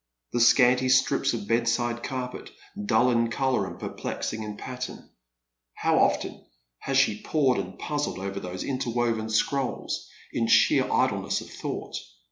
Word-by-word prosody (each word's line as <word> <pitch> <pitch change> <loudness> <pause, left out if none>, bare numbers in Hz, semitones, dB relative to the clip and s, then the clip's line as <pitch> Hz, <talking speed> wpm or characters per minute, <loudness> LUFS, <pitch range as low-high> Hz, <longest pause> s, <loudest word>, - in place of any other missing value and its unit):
The 120 - +1
scanty 125 +1 +5
stxips 135 +1 +3
of 105 -3 -6
bedside 120 +1 +1
carpet, 125 -1 -5 0.4
dull 120 +4 +4
in 115 -1 +2
colour 125 -4 0
and 85 - -8
perplexing 110 - -4
in 105 -1 -6
pattern. 125 -1 -7 0.6
How - - +2
often - - +1 0.4
has 135 -1 -1
she 110 -6 +3
pored 135 -7 +2
and 95 -1 -6
puzzled 145 -6 -2
over 100 +1 -4
those 90 -1 -5
interwoven 120 -4 -1
scrolls, 130 +4 -1 0.2
in - - 0
sheer - - +4
idleness - - +1
of - - -11
thought. - - -5
120 Hz, 140 wpm, -26 LUFS, 110-130 Hz, 0.6 s, scanty